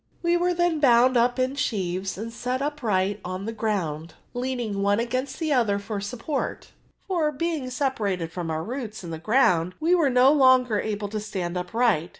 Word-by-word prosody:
We 340 Hz, 0 st, +3 dB
were 355 Hz, +1 st, +2 dB
then 345 Hz, -2 st, +1 dB
bound 255 Hz, -2 st, +5 dB
up 245 Hz, +1 st, +3 dB
in 255 Hz, +1 st, 0 dB
Bheaves 190 Hz, -8 st, -2 dB
and 225 Hz, +3 st, -6 dB
set 250 Hz, +2 st, -2 dB
upi%lit 215 Hz, -9 st, -1 dB
on 185 Hz, +2 st, -5 dB
the 225 Hz, -, -4 dB
ground, 170 Hz, -8 st, -3 dB, 0.2 s
leaning 245 Hz, -5 st, -2 dB
one 200 Hz, +1 st, +2 dB
against 255 Hz, +3 st, -2 dB
the 315 Hz, -3 st, 0 dB
other 225 Hz, -6 st, +2 dB
for 200 Hz, 0 st, -5 dB
support; 250 Hz, +7 st, -4 dB, 0.4 s
for, 335 Hz, -6 st, +1 dB
being 300 Hz, -2 st, -2 dB
separated 210 Hz, -, -1 dB
from 170 Hz, -1 st, -4 dB
our 160 Hz, 0 st, -2 dB
roots 230 Hz, -1 st, -6 dB
in 170 Hz, -, -7 dB
the 160 Hz, -, -5 dB
ground, 185 Hz, -4 st, +2 dB
we 325 Hz, +3 st, +2 dB
Were 330 Hz, -6 st, +4 dB
no 255 Hz, +2 st, +5 dB
longer 255 Hz, -6 st, +4 dB
able 205 Hz, -1 st, -3 dB
to 215 Hz, +1 st, -3 dB
stand 185 Hz, -4 st, -4 dB
upright. 180 Hz, -2 st, +1 dB
230 Hz, 180 wpm, -25 LUFS, 195-265 Hz, 0.4 s, bound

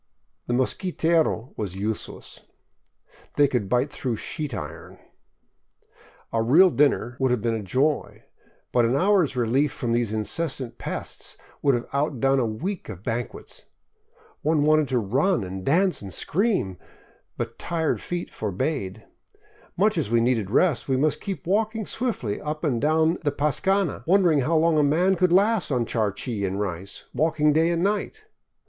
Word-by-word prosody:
The 120 Hz, -, 0 dB
mosquitero 160 Hz, -, +1 dB
was 100 Hz, -4 st, -4 dB
useless. 105 Hz, +3 st, -5 dB, 0.9 s
They 145 Hz, -1 st, +5 dB
could 120 Hz, -8 st, -2 dB
bite 125 Hz, +5 st, +1 dB
through 130 Hz, -5 st, -2 dB
sheet 150 Hz, +6 st, -4 dB
iron. 75 Hz, -9 st, -7 dB, 1.4 s
A 115 Hz, -, +2 dB
real 165 Hz, +11 st, +6 dB
dinner 135 Hz, -5 st, +2 dB
would 130 Hz, -1 st, +2 dB
have 125 Hz, -3 st, 0 dB
been 115 Hz, -1 st, +1 dB
a 110 Hz, -, -2 dB
joy, 135 Hz, +9 st, -1 dB, 0.5 s
but 120 Hz, -, +3 dB
an 115 Hz, +3 st, +2 dB
hour's 185 Hz, -3 st, +3 dB
relief 125 Hz, +4 st, +1 dB
from 120 Hz, -, -3 dB
these 120 Hz, -2 st, +1 dB
incessant 130 Hz, +4 st, -2 dB
pests -, -, -6 dB, 0.2 s
would 140 Hz, -3 st, +3 dB
have 120 Hz, -, -3 dB
outdone 135 Hz, -2 st, +1 dB
a 120 Hz, -, +1 dB
week 175 Hz, -, -4 dB
of 95 Hz, +1 st, -8 dB
banquets. 120 Hz, +1 st, -5 dB, 0.8 s
One 155 Hz, -2 st, +2 dB
wanted 155 Hz, 0 st, +4 dB
to 130 Hz, -, 0 dB
run 130 Hz, -, +1 dB
and 95 Hz, 0 st, -6 dB
dance 180 Hz, -, +2 dB
and 100 Hz, -2 st, -8 dB
scream, 160 Hz, -, 0 dB, 0.6 s
but -, -, -5 dB
tired 165 Hz, -2 st, -1 dB
feet 175 Hz, 0 st, -4 dB
forbade. 105 Hz, -, -3 dB, 0.7 s
Much 205 Hz, 0 st, +3 dB
as 140 Hz, -, -2 dB
we 115 Hz, 0 st, +3 dB
needed 115 Hz, -4 st, +1 dB
rest, 140 Hz, -, +2 dB
we 130 Hz, -, +2 dB
must 150 Hz, +3 st, +1 dB
keep 195 Hz, -7 st, -5 dB
walking 220 Hz, +3 st, 0 dB
swiftly 215 Hz, -, -3 dB
up 155 Hz, +1 st, -4 dB
and 130 Hz, -7 st, 0 dB
down 160 Hz, +3 st, +2 dB
the 150 Hz, -3 st, 0 dB
pascana, 185 Hz, +7 st, 0 dB
wondering 175 Hz, -5 st, +4 dB
how 160 Hz, +6 st, +1 dB
long 160 Hz, -1 st, +3 dB
a -, -, +4 dB
man 175 Hz, +7 st, +3 dB
would 180 Hz, -2 st, +4 dB
last 205 Hz, +2 st, +3 dB
on 125 Hz, -4 st, 0 dB
charqui 110 Hz, 0 st, -2 dB
and 95 Hz, +1 st, -2 dB
rice, 95 Hz, -1 st, -4 dB
walking 150 Hz, -1 st, +2 dB
day 160 Hz, +2 st, +3 dB
and 170 Hz, 0 st, 0 dB
night. 210 Hz, -, -1 dB
140 Hz, 155 wpm, -24 LUFS, 115-170 Hz, 1.4 s, real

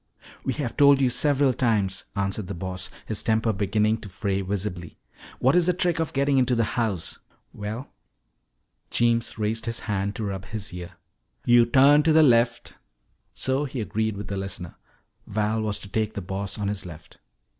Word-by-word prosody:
"We 130 Hz, -, -1 dB
have 135 Hz, -4 st, -4 dB
told 140 Hz, -2 st, +6 dB
you 130 Hz, -2 st, +3 dB
several 140 Hz, -1 st, +3 dB
times," 105 Hz, -7 st, 0 dB
answered 100 Hz, 0 st, -2 dB
the 100 Hz, -, -5 dB
Boss, 95 Hz, +1 st, -3 dB, 0.2 s
his 110 Hz, -, -2 dB
temper 110 Hz, 0 st, +1 dB
beginning 105 Hz, +2 st, +1 dB
to 100 Hz, -, -9 dB
fray 100 Hz, +1 st, -2 dB
visibly. 95 Hz, -3 st, -4 dB, 0.4 s
"What 130 Hz, +6 st, +3 dB
is 180 Hz, -1 st, +4 dB
the 180 Hz, -, +4 dB
trick 175 Hz, -2 st, 0 dB
of 160 Hz, -, -1 dB
getting 140 Hz, 0 st, +2 dB
into 125 Hz, -1 st, +2 dB
that 115 Hz, -, +2 dB
house?" 110 Hz, -8 st, -1 dB, 0.3 s
"Well," 110 Hz, +6 st, -5 dB, 1.0 s
Jeems 115 Hz, -1 st, +1 dB
raised 110 Hz, +1 st, -1 dB
his 115 Hz, 0 st, -2 dB
hand 100 Hz, -1 st, -2 dB
to 115 Hz, -, -4 dB
rub 95 Hz, -2 st, -4 dB
his 100 Hz, -2 st, -5 dB
ear, 90 Hz, -1 st, -7 dB, 0.5 s
"yo' 120 Hz, -1 st, +6 dB
turn 140 Hz, +5 st, +6 dB
to 160 Hz, +1 st, +3 dB
the 160 Hz, 0 st, +7 dB
left 115 Hz, -3 st, +3 dB, 0.3 s
" -, -, -45 dB
So 130 Hz, +2 st, 0 dB
he 135 Hz, -2 st, -5 dB
agreed 110 Hz, -1 st, -1 dB
with 105 Hz, -, -6 dB
the 100 Hz, -, -4 dB
listener. 95 Hz, -3 st, -5 dB, 0.5 s
Val 110 Hz, +1 st, 0 dB
was 105 Hz, -2 st, -1 dB
to -, -, -10 dB
take 110 Hz, +2 st, -2 dB
the 100 Hz, -, -3 dB
Boss 100 Hz, +2 st, -4 dB
on 105 Hz, -1 st, -2 dB
his 100 Hz, -1 st, -3 dB
left. 80 Hz, -3 st, -12 dB
110 Hz, 185 wpm, -25 LUFS, 100-125 Hz, 1.0 s, the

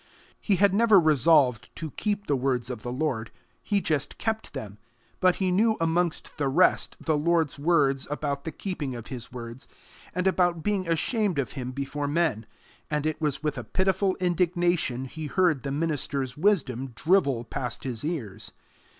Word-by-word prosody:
He 200 Hz, -, +1 dB
had 200 Hz, +1 st, +4 dB
never 215 Hz, -1 st, +6 dB
resolved 145 Hz, -6 st, +4 dB
to 160 Hz, -2 st, -5 dB
keep 205 Hz, +4 st, -2 dB
the 145 Hz, -, +1 dB
words 125 Hz, -2 st, -1 dB
of 120 Hz, -3 st, -6 dB
the 120 Hz, -, -5 dB
Lord: 125 Hz, -5 st, -2 dB, 0.3 s
he 205 Hz, -1 st, 0 dB
just 145 Hz, -5 st, -1 dB
kept 220 Hz, -1 st, -3 dB
them; 105 Hz, -1 st, -7 dB, 0.4 s
but 185 Hz, -2 st, +4 dB
he 190 Hz, -2 st, 0 dB
knew 220 Hz, +4 st, +3 dB
amongst 165 Hz, 0 st, 0 dB
the 145 Hz, -, +1 dB
rest 175 Hz, +7 st, +3 dB
the 160 Hz, -, 0 dB
Lord's 160 Hz, -2 st, +1 dB
words 145 Hz, -4 st, +2 dB
about 145 Hz, -1 st, -2 dB
the 160 Hz, -, -4 dB
keeping 150 Hz, -7 st, -4 dB
of 120 Hz, -1 st, -8 dB
his 125 Hz, -3 st, -6 dB
words, 120 Hz, 0 st, -8 dB, 0.5 s
and 180 Hz, 0 st, 0 dB
about 175 Hz, -3 st, +2 dB
being 195 Hz, -4 st, 0 dB
ashamed 195 Hz, -, +1 dB
of 130 Hz, -7 st, -1 dB
him 125 Hz, -2 st, -5 dB
before 140 Hz, +2 st, -3 dB
men, 145 Hz, -8 st, 0 dB, 0.4 s
and 150 Hz, -1 st, -1 dB
it 155 Hz, 0 st, -2 dB
was 150 Hz, -1 st, -1 dB
with 150 Hz, -4 st, -1 dB
a -, -, -5 dB
pitiful 190 Hz, -, +1 dB
indignation 175 Hz, -6 st, +1 dB
he 155 Hz, +4 st, -6 dB
heard 170 Hz, -4 st, +2 dB
the 140 Hz, -, -4 dB
minister's 140 Hz, -3 st, -2 dB
wisdom 135 Hz, -, 0 dB
drivel 145 Hz, -9 st, +2 dB
past 120 Hz, 0 st, -4 dB
his 120 Hz, -4 st, -3 dB
ears. 145 Hz, -, -4 dB
150 Hz, 170 wpm, -27 LUFS, 130-180 Hz, 0.5 s, never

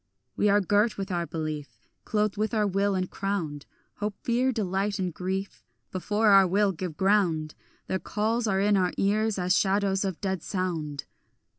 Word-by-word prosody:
We 210 Hz, -, +2 dB
are 205 Hz, +1 st, +4 dB
girt 205 Hz, +4 st, +2 dB
with 195 Hz, 0 st, -4 dB
our 170 Hz, -1 st, -1 dB
belief, 155 Hz, -3 st, -5 dB, 0.3 s
Clothed 210 Hz, -1 st, 0 dB
with 215 Hz, +2 st, -1 dB
our 210 Hz, -1 st, +2 dB
will 200 Hz, 0 st, +1 dB
and 185 Hz, -1 st, -1 dB
crowned; 175 Hz, -9 st, -3 dB, 0.3 s
Hope, 210 Hz, -1 st, -3 dB
fear, 245 Hz, +2 st, +2 dB
delight, 200 Hz, -2 st, -1 dB
and 185 Hz, -3 st, -2 dB
grief, 190 Hz, +3 st, -4 dB, 0.3 s
Before 210 Hz, +4 st, +1 dB
our 195 Hz, -2 st, +7 dB
will 200 Hz, +2 st, +2 dB
give 175 Hz, -3 st, -6 dB
ground; 180 Hz, -6 st, +2 dB, 0.3 s
Their 190 Hz, -, -2 dB
calls 225 Hz, +4 st, -1 dB
are 195 Hz, -2 st, +1 dB
in 205 Hz, 0 st, +3 dB
our 180 Hz, -1 st, +1 dB
ears 215 Hz, +2 st, +1 dB
as 180 Hz, 0 st, +2 dB
shadows 195 Hz, 0 st, +2 dB
of 190 Hz, -4 st, -3 dB
dead 190 Hz, -4 st, -2 dB
sound. 165 Hz, -8 st, -3 dB
195 Hz, 170 wpm, -27 LUFS, 180-210 Hz, 0.3 s, our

